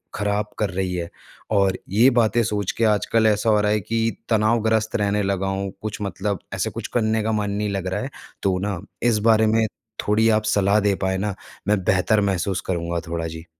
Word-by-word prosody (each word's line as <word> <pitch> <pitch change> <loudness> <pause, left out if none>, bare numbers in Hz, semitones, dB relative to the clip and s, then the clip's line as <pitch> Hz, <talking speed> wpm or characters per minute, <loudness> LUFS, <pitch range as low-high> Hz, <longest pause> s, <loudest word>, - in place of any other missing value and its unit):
ख़राब 105 +1 -1
कर 105 - +1
रही 95 0 -2
है 85 -1 -3 0.4
और 100 -3 +2
ये 115 +7 +5
बातें 115 +1 +3
सोच 105 -3 -1
के 115 - +1
आजकल 110 +2 +2
ऐसा 110 +1 +2
हो 105 - +4
रहा 105 0 +1
है 105 - +2
कि 115 +2 -1
तनावग्रस्त 110 0 +2
रहने 105 -1 +1
लगा 95 -1 -1
हूँ 95 0 -2
कुछ 105 -1 -5
मतलब 100 -1 -2
ऐसे - - -1
कुछ - - -6
करने 110 -2 +1
का 110 - 0
मन 105 -2 -1
नहीं 105 +1 -1
लग 95 -2 -3
रहा 95 - -2
है, - - -4 0.3
तो 95 -2 +2
न 100 -3 -3 0.3
इस 115 -3 +3
बारे 110 0 +5
में 110 +1 +3 0.4
थोड़ी 110 +2 +3
आप 110 -1 +3
सलाह 100 +1 +3
दे 100 -1 +2
पाएँ 95 0 0
न, 105 +1 -2 0.3
मैं 105 -2 +2
बेहतर 95 +4 +2
महसूस 95 +1 -1
करूँगा 85 -1 -1
थोड़ा 85 -1 -2
जी। 80 +1 -8
105 Hz, 205 wpm, -22 LUFS, 95-110 Hz, 0.4 s, ये